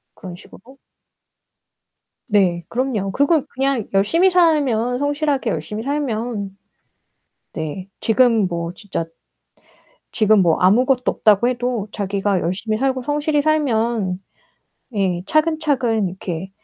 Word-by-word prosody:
그런 185 Hz, -4 st, -9 dB
식으로? 255 Hz, +9 st, -16 dB, 1.5 s
네. 190 Hz, -7 st, +1 dB
그럼요. 235 Hz, -6 st, -1 dB
그리고 285 Hz, -, +2 dB
그냥 265 Hz, -4 st, -1 dB
열심히 325 Hz, -, +3 dB
살면 275 Hz, -9 st, +2 dB
성실하게 285 Hz, -1 st, 0 dB
열심히 215 Hz, 0 st, -4 dB
살면 230 Hz, -8 st, -3 dB, 1.0 s
네, 160 Hz, +4 st, -5 dB
지금 225 Hz, -3 st, +3 dB
뭐 170 Hz, -1 st, -4 dB
진짜. 185 Hz, -3 st, -5 dB, 1.1 s
지금 215 Hz, -2 st, +4 dB
뭐 165 Hz, -2 st, +3 dB
아무것도 250 Hz, +7 st, +3 dB
없다고 215 Hz, +2 st, +3 dB
해도 245 Hz, -3 st, -1 dB
자기가 200 Hz, -1 st, -1 dB
열심히 195 Hz, +6 st, -2 dB
살고 260 Hz, 0 st, 0 dB
성실히 295 Hz, +2 st, 0 dB
살면 235 Hz, -10 st, 0 dB, 0.8 s
예, 185 Hz, -3 st, 0 dB
차근차근 285 Hz, -, +1 dB
이렇게 180 Hz, 0 st, -6 dB
230 Hz, 240 characters per minute, -20 LUFS, 195-275 Hz, 1.5 s, 지금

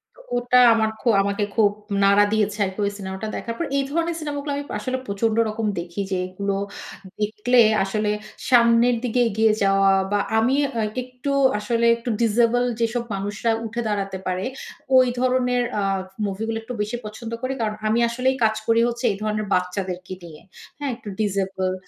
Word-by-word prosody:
তো -, -, -19 dB, 0.2 s
ওটা 245 Hz, +1 st, +2 dB, 0.2 s
আমার 220 Hz, -1 st, +2 dB
খু 250 Hz, -, -6 dB
আমাকে 200 Hz, +1 st, -1 dB
খুব 210 Hz, -3 st, +4 dB, 0.3 s
নাড়া 200 Hz, +1 st, +5 dB
দিয়েছে, 210 Hz, -1 st, +1 dB
আরকি 190 Hz, +2 st, -6 dB
ওই 200 Hz, -, 0 dB
সিনেমাটা 190 Hz, +2 st, -5 dB
দেখার 230 Hz, -, -4 dB
পর। 335 Hz, -, -2 dB
এই 275 Hz, -, +2 dB
ধরনের 335 Hz, +1 st, 0 dB
সিনেমা 295 Hz, -2 st, -4 dB
গুলো 290 Hz, 0 st, -4 dB
আমি 285 Hz, -, -3 dB, 0.2 s
আসলে 255 Hz, +2 st, -2 dB
প্রচন্ড 215 Hz, +2 st, 0 dB
রকম 215 Hz, 0 st, -2 dB
দেখি। 170 Hz, +3 st, -7 dB
যেগুলো 185 Hz, +2 st, -2 dB, 0.6 s
দেখলে 215 Hz, +4 st, +3 dB, 0.2 s
আসলে 210 Hz, +2 st, -1 dB, 0.4 s
সামনের 235 Hz, 0 st, +5 dB
দিকে 245 Hz, 0 st, 0 dB
এগিয়ে 220 Hz, +1 st, +3 dB
যাওয়া, 195 Hz, 0 st, +4 dB, 0.2 s
বা 205 Hz, -, +2 dB, 0.2 s
আমি 250 Hz, +5 st, +3 dB, 0.2 s
আ -, -, +1 dB, 0.2 s
একটু 255 Hz, +2 st, -5 dB, 0.3 s
আসলে 235 Hz, +2 st, 0 dB
একটু 235 Hz, +1 st, -6 dB
ডিজেবল 235 Hz, +2 st, +3 dB, 0.2 s
যেসব 235 Hz, +1 st, 0 dB
মানুষরা 205 Hz, +4 st, -1 dB
উঠে 235 Hz, +2 st, -3 dB
দাঁড়াতে 195 Hz, -2 st, -2 dB
পারে, 185 Hz, +1 st, -1 dB, 0.5 s
ওই 255 Hz, -1 st, +6 dB
ধরনের 250 Hz, -1 st, +2 dB, 0.2 s
আ -, -, 0 dB, 0.4 s
মুভি 200 Hz, +2 st, -3 dB
গুলো 225 Hz, 0 st, -2 dB
একটু 250 Hz, -, -6 dB
বেশি 215 Hz, +3 st, -2 dB
পছন্দ 225 Hz, +2 st, -7 dB
করি। 260 Hz, +1 st, -2 dB
কারণ 215 Hz, -1 st, -1 dB
আমি 225 Hz, +2 st, +2 dB
আসলেই 255 Hz, +2 st, 0 dB
কাজ 220 Hz, 0 st, +3 dB
করি 230 Hz, 0 st, +4 dB
হচ্ছে 240 Hz, +1 st, -3 dB
এই 195 Hz, -, -4 dB
ধরনের 215 Hz, 0 st, -1 dB
বাচ্চাদেরকে 180 Hz, 0 st, -2 dB
নিয়ে, 155 Hz, -3 st, -11 dB, 0.4 s
হ্যাঁ? 285 Hz, -3 st, -3 dB
একটু 220 Hz, -3 st, -10 dB
ডিজেবল 190 Hz, -2 st, -1 dB
220 Hz, 175 wpm, -23 LUFS, 200-245 Hz, 0.6 s, ওই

